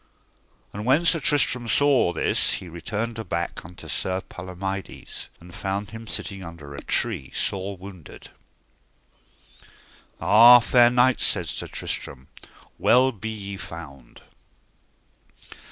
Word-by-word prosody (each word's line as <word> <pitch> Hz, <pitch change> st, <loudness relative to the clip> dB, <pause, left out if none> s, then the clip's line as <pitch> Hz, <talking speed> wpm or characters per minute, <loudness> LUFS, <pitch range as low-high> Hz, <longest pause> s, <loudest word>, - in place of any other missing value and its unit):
And 105 Hz, -, -6 dB
when 135 Hz, +8 st, +2 dB
Sir 165 Hz, -1 st, +4 dB
Tristram 135 Hz, -5 st, +2 dB
saw 140 Hz, -10 st, +3 dB
this -, -, +3 dB
he 95 Hz, -, -4 dB
returned 105 Hz, +7 st, -4 dB
aback 85 Hz, -5 st, -4 dB
unto 90 Hz, +1 st, -12 dB
Sir 95 Hz, 0 st, -2 dB
Palomides, 95 Hz, +2 st, -7 dB
and 85 Hz, +1 st, -15 dB
found 100 Hz, +2 st, -4 dB
him 115 Hz, 0 st, -9 dB
sitting 100 Hz, -3 st, -5 dB
under 85 Hz, -4 st, -10 dB
a 70 Hz, -, -8 dB
tree -, -, -2 dB
sore 95 Hz, 0 st, -2 dB
wounded. 90 Hz, -4 st, -12 dB, 1.9 s
Ah, 120 Hz, +3 st, +8 dB
fair 120 Hz, 0 st, +5 dB
knight, 125 Hz, +1 st, +3 dB
said 90 Hz, -4 st, +2 dB
Sir 75 Hz, -, -5 dB
Tristram, 65 Hz, -1 st, -5 dB, 0.5 s
well 130 Hz, +2 st, +4 dB
be 110 Hz, -1 st, -7 dB
ye 100 Hz, -2 st, -6 dB
found. 70 Hz, -9 st, -11 dB
100 Hz, 120 wpm, -24 LUFS, 90-120 Hz, 1.9 s, Ah